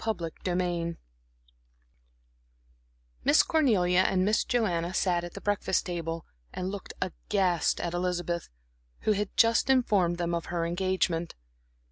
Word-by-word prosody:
Chapter 180 -7 -2 0.2
VIII 175 -2 -1 2.3
Miss - - +5
Cornelia 200 - +3
and 185 0 +2
Miss 215 +1 +2
Joanna 185 -7 0
sat 175 -2 +1
at 175 - -8
the 200 - -7
breakfast 205 -2 0
table 165 -2 -4 0.3
and 185 +1 -4
looked 200 -2 -7
aghast 185 -1 0
at 170 - -3
Elizabeth, 175 -1 -2 0.5
who - - +2
had 205 -1 0
just 230 +3 +4
informed 205 -10 +3
them 170 0 -1
of 170 -1 -2
her 170 -1 -2
engagement. 175 -1 -1
180 Hz, 125 wpm, -28 LUFS, 170-200 Hz, 2.3 s, Miss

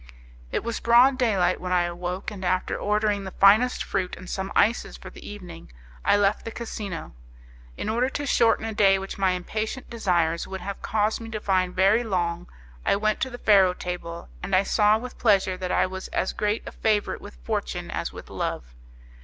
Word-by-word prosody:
It - - -1
was 235 -1 -3
broad 250 +3 +5
day 225 -5 +2
light 180 0 +1
when 180 0 -4
I 180 -1 +3
awoke, 175 +3 -4
and 195 -3 -8
after 185 0 0
ordering 210 -1 0
the 190 - -5
finest 210 +7 +4
fruit 185 -2 -2
and 185 - -11
some 190 +1 -4
ices 225 +3 +2
for - - -11
the - - -13
evening 180 - -10 0.3
I - - +4
left 205 0 +2
the - - -5
casino. 215 - -6 0.6
In - - -4
order 240 +4 +1
to 290 +2 -4
shorten 230 -4 +3
a 225 - -3
day 195 -2 +4
which 195 +1 -6
my 190 -1 +3
impatient 215 +8 -4
desires 175 -7 0
would 190 -1 -6
have 195 +2 -6
caused 215 +1 0
me 225 - -7
to 220 -1 -4
find 185 -3 0
very 200 +5 +4
long, 175 -5 -2 0.4
I - - +3
went 215 +1 0
to 260 - 0
the 245 - -8
faro 195 -5 +4
table, 170 -2 -6
and 195 - 0
I 185 - +4
saw 210 +1 +3
with 245 +2 -9
pleasure 195 -4 +3
that 185 0 -4
I - - +3
was 190 0 -6
as - - -1
great 210 +1 -1
a - - -6
favourite 215 -2 0
with - - -11
fortune - - -4
as - - -3
with - - -11
love. - - -4
195 Hz, 205 wpm, -25 LUFS, 180-220 Hz, 0.6 s, broad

